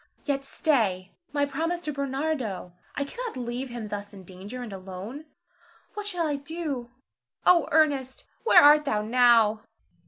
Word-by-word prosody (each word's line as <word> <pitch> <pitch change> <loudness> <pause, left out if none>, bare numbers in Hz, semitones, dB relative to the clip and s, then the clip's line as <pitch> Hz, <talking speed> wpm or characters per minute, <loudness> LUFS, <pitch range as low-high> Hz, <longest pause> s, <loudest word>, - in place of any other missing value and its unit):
Yet 275 -2 -1
stay! 215 - 0 0.2
my 285 0 +1
promise 325 +5 -2
to 305 -3 -4
Bernardo! 270 - -3 0.2
I 280 - 0
cannot 470 - -6
leave 245 +2 -4
him 235 -3 -6
thus 205 0 -6
in 190 - -11
danger, 195 +7 -8
and 220 -4 -7
alone. 195 +10 -8 0.7
What 420 -1 -5
shall 355 -5 -1
I 295 -2 -1
do? 285 -4 -5 0.6
Oh, 345 -3 +5
Ernest, 280 -4 +2 0.2
where 460 - +7
art 295 +1 +7
thou 210 -6 0
now? 230 -2 +4
265 Hz, 150 wpm, -26 LUFS, 215-300 Hz, 0.7 s, where